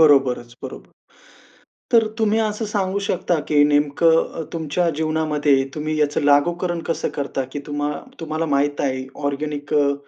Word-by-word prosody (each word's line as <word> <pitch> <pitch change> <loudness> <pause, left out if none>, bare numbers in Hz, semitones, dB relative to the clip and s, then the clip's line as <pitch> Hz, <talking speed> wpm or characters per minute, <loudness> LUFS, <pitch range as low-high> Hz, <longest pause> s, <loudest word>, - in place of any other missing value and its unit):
बरोबरच, 130 -6 +4
बरोबर. - - -8 1.0
तर 225 -1 +6
तुम्ही 220 0 +2
असं 215 0 -1
सांगू 200 -2 -1
शकता 180 -4 0
की 145 -1 +5
नेमकं 150 +3 +3
अ, - - -4
तुमच्या 165 +1 0
जीवनामध्ये 155 -3 +2
तुम्ही 155 0 -2
याचं 150 -1 +1
लागूकरण 170 +4 +2
कसं 165 - -1
करता, 140 -1 -2
की 145 - -3
तुम्हा 145 0 -1 0.3
तुम्हाला 160 0 -2
माहित 145 0 +1
आहे 130 -1 -1 0.2
ऑर्गेनिक 145 0 -3
अ, 145 -1 +3
150 Hz, 145 wpm, -21 LUFS, 145-170 Hz, 1.0 s, तर